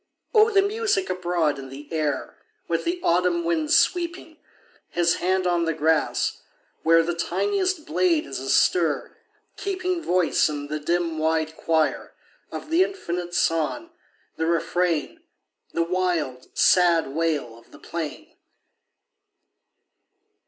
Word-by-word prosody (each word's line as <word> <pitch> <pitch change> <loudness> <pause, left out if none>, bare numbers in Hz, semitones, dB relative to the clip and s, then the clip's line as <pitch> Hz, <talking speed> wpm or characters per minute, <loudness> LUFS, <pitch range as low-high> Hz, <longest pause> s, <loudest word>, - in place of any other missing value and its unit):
O 435 -1 +6
the 395 -3 +4
music 415 -2 0
abroad 175 -5 0
in 135 -1 -8
the 140 +2 -10
air, 150 -4 -2 0.3
With 165 -1 -1
the 350 +1 -1
autumn 175 0 +2
wind 165 -2 0
sweeping 340 -2 +1 0.5
His 170 -1 +1
hand 185 +1 0
on 175 -1 +1
the 165 -1 -1
grass, 160 0 +1 0.4
where 165 0 +5
The 175 +1 -1
tiniest 365 - -1
blade 335 -4 +1
is - - -5
astir, - - +1 0.4
keeping 370 -3 -2
Voice 180 - +2
in 145 -1 -5
the 155 0 -2
dim, 165 +1 -1
wide 160 0 0
choir, 160 -1 0 0.4
Of 305 - -7
the 335 +2 +4
infinite 175 - -4
song, 165 - 0 0.5
the 160 - -1
refrain, 170 - 0 0.5
The 170 - 0
wild, 170 -7 -2
sad 170 -5 +4
wail 150 -6 -1
of 115 - -19
the - - -15
plain 160 -3 -6
170 Hz, 125 wpm, -24 LUFS, -, 0.5 s, O